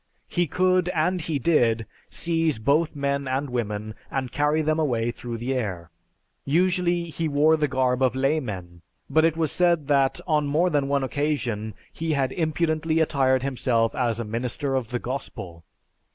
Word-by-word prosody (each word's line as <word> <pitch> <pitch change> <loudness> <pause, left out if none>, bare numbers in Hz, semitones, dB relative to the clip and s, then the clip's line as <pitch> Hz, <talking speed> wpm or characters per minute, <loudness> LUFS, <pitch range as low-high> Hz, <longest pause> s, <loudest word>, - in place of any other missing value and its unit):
He 175 -1 0
could, 185 +2 +2
and 180 +3 +1
he 155 -1 -1
did, 120 -6 +2 0.2
seize 165 -4 0
both 145 +9 +1
men 140 -1 -1
and 130 +1 -2
women 110 -3 -3 0.2
and 130 -2 -3
carry 150 +2 +1
them 155 +1 +1
away 120 -6 0
through 120 -1 -6
the 120 +4 -2
air. 95 -9 -3 0.5
Usually 175 +2 +1
he 165 +1 -2
wore 150 +2 +4
the 150 -1 +1
garb 130 -1 0
of 130 -1 +2
laymen, 110 - -2 0.3
but 160 0 +4
it 165 -1 +1
was 160 -3 +1
said 170 -5 +2
that, 135 -2 +3
on 150 -3 +1
more 165 +5 +2
than 145 -2 +1
one 140 -1 +1
occasion, 125 -7 -2 0.2
he 160 -1 -2
had 135 -2 0
impudently 160 0 0
attired 130 -4 +2
himself 120 -4 +1
as 120 -4 0
a 115 - -3
minister 125 +5 -2
of 130 -4 -1
the 125 - -1
Gospel. 95 -10 -6
140 Hz, 165 wpm, -25 LUFS, 120-160 Hz, 0.5 s, wore